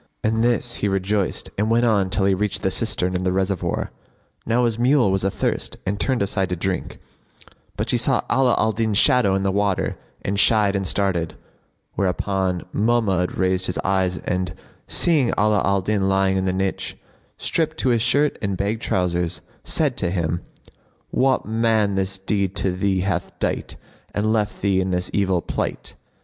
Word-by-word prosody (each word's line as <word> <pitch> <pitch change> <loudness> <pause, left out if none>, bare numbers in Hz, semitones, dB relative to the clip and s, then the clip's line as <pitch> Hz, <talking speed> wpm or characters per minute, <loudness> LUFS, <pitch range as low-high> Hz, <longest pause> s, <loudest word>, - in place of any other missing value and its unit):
At 110 +1 +1
this 120 0 0
he 105 - 0
rejoiced 95 0 -1
and 105 +1 +1
went 115 +1 +3
on 100 -5 +2
till 95 +1 +1
he 100 - +3
reached 105 +2 -1
the - - +1
cistern 90 +1 0
and 90 - -1
the 90 - +1
reservoir. 95 -1 -1 0.6
Now 120 +2 +2
his 115 -1 -1
mule 125 -4 +4
was 95 -1 0
athirst 95 - -2
and 100 +2 -2
turned 130 -4 +1
aside 95 -1 -1
to 90 - -1
drink, 90 +2 -3 0.8
but - - -2
she - - +2
saw - - +2
Ala 130 0 +3
al 110 - +2
Din's 110 -1 0
shadow 105 -6 +4
in 95 - 0
the 95 - +1
water 100 -1 0 0.3
and 100 +1 -1
shied 105 -2 +4
and 95 -1 -1
started; 90 -5 0 0.6
whereupon 95 -1 -1
Mahmud 105 -5 +1
raised 95 0 +1
his 90 - -3
eyes 95 -1 +1
and, 90 -1 -2 0.3
seeing 155 -7 +3
Ala 105 -1 +3
al 100 0 +2
Din 95 0 0
lying 95 0 +2
in 95 0 0
the 95 - +1
niche, 95 +1 -2 0.4
stripped 160 -1 -1
to 130 - +2
his 120 -2 +2
shirt 140 +5 +2
and 100 -2 -2
bag 105 +4 -1
trousers, 90 -4 -1 0.2
said 145 -6 +1
to 85 - 0
him, 85 -2 -1 0.7
"What 130 0 +2
man 110 -2 +1
this 95 0 -1
deed 95 0 -1
to 95 - 0
thee 95 +1 0
hath 90 -2 -2
dight - - -2 0.4
and 110 +2 +1
left 105 -2 -1
thee 95 -2 +2
in 95 - -1
this 90 0 -1
evil 95 -3 +1
plight?" - - -4
100 Hz, 180 wpm, -22 LUFS, 95-110 Hz, 0.8 s, mule